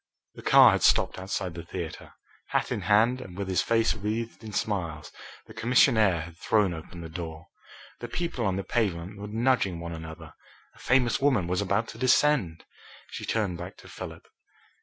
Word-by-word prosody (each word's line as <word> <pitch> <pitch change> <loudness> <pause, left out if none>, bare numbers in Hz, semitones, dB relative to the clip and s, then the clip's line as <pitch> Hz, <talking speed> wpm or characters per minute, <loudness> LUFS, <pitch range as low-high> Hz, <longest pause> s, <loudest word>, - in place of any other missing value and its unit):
The - - -11
car - - +7
had - - 0
stopped - - +3
outside 95 -1 -3
the 85 - -6
theatre. 85 -1 -7 0.3
Hat - - -1
in - - -1
hand, 110 +5 +3
and 90 -1 -10
with 100 -1 -3
his 95 -2 +1
face 115 -1 +2
wreathed 110 +3 -4
in 110 - -7
smiles, 85 -8 -3 0.3
the - - -13
commissionaire 110 - +3
had 85 0 -10
thrown 100 0 +2
open 85 +2 -9
the 85 - -7
door. 80 -1 -7 0.5
The 120 - -6
people 165 -2 -3
on 95 -3 +1
the 100 - -2
pavement 100 -4 -2
were 105 - -6
nudging 110 -5 +1
one 85 0 -6
another 80 -1 -9 0.4
a - - -21
famous 125 -2 +2
woman 130 -10 +2
was 90 +2 0
about 105 +3 0
to 115 - -10
descend. 130 - +2 0.5
She - - -6
turned 100 -6 -1
back 90 - -8
to - - -14
Philip. - - -9
100 Hz, 180 wpm, -27 LUFS, 85-115 Hz, 0.5 s, car